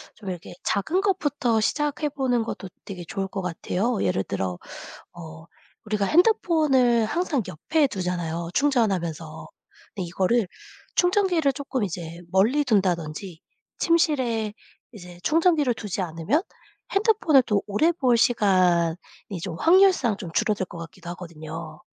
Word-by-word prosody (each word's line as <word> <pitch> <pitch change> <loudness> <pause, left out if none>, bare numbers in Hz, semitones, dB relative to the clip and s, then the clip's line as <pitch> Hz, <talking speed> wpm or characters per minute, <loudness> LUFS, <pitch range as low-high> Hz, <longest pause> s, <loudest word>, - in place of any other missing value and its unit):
좀 200 -3 -8
이렇게 175 -2 -7
작은 315 - 0
것부터 290 - +1
시작해 295 +6 0
보는 255 -4 0
것도 195 -3 -6 0.2
되게 185 -3 -7
좋을 195 +3 -3
것 195 0 -5
같아요. 190 +6 -2
예를 95 0 +1
들어 95 -3 -3 0.6
어, 160 -1 -10 0.4
우리가 210 -2 0
핸드폰을 305 - +3
항상 300 +2 0
옆에 300 - +1
두잖아요, 175 -4 -3
충전하면서. 180 - 0 0.5
근데 190 - -3
이거를 190 +5 +1 0.5
충전기를 355 -6 +2
쪼끔 270 -3 -3
이제 170 -3 -5
멀리 225 +10 +3
둔다든지 180 - -1 0.4
침실에 255 -10 +1 0.4
이제 180 -6 -12
충전기를 320 -5 +3
두지 205 -4 -4
않으면 175 - 0 0.5
핸드폰을 395 - +4
더 210 -4 +1
오래 215 +12 +3
볼 260 -8 +2
시간이 185 -8 +3 0.5
좀 170 -1 -5
확률상 350 - +4
좀 175 -5 -7
줄어들 210 -1 +1
것 175 - -11
같기도 170 +1 -9
하거든요. 160 -2 -8
210 Hz, 300 characters per minute, -24 LUFS, 175-285 Hz, 0.6 s, 핸드폰을